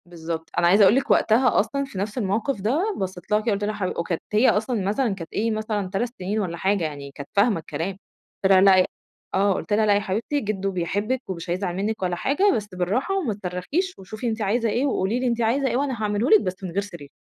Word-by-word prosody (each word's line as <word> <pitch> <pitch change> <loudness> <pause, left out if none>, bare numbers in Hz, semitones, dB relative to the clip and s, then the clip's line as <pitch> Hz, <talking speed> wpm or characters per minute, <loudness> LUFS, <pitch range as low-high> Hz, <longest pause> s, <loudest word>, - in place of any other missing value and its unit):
بالضبط، 165 -2 -6
أنا 170 - +4
عايزة 200 +4 +6
أقول 200 +4 +6
لِك 270 - +1
وقتها 235 +3 +4
أصلًا 230 +7 0
في 270 - -10
نفْس 205 +5 -3
الموقف 215 +2 -1
ده 315 - 0
بصّيت 185 0 -5
لها 210 - +4
كده 220 +1 -1
قُلت 200 +1 -2
لها 210 +1 -1
حـب 200 -3 -2
وكانت 170 0 -2
هي 220 +5 +5
أصلًا 220 +1 0
مثلًا 215 +2 +1
كانت 165 -4 -9
إيه 225 +2 0
مثلًا 215 -3 -2
3 205 +6 -1
سنين 195 +4 -2
والّا 175 -4 -3
حاجة، 195 0 +1
يعني 145 -3 -5
كانت 140 0 -9
فاهمة 205 -2 +3
الكلام، 165 +3 -4 0.5
قُلت 190 - +4
لها 190 -1 +7
لأ 190 -1 +6 0.5
آه 195 +1 +3
قُلت 205 - -3
لها: 215 +1 +3
"لأ 205 -1 +4
يا - - +3
حبيبتي، 215 +8 -2
جدو 195 -4 -2
بيحبِك 205 +8 -1
ومش 175 -2 -5
هيزعل 180 0 -2
منِك 210 +3 -2
ولا 180 -1 0
حاجة، 360 - +2
بس 210 -1 -3
بالراحة 205 - 0
وما 290 - -1
تصرخيش 200 - -3
وشوفي 215 +5 -6
أنتِ 225 -1 -2
عايزة 225 +3 +1
إيه، 240 +6 0
وقولي 230 -3 0
لي 255 - 0
أنتِ 235 -1 0
عايزة 255 +5 +2
إيه 240 -1 0
وأنا 265 -4 -2
هاعمله 210 +3 0
لِك 435 - +7
بس 185 +1 -4
من 185 - -4
غير 195 +4 0
صريخ." 170 -8 -10
205 Hz, 235 wpm, -24 LUFS, 185-230 Hz, 0.5 s, لها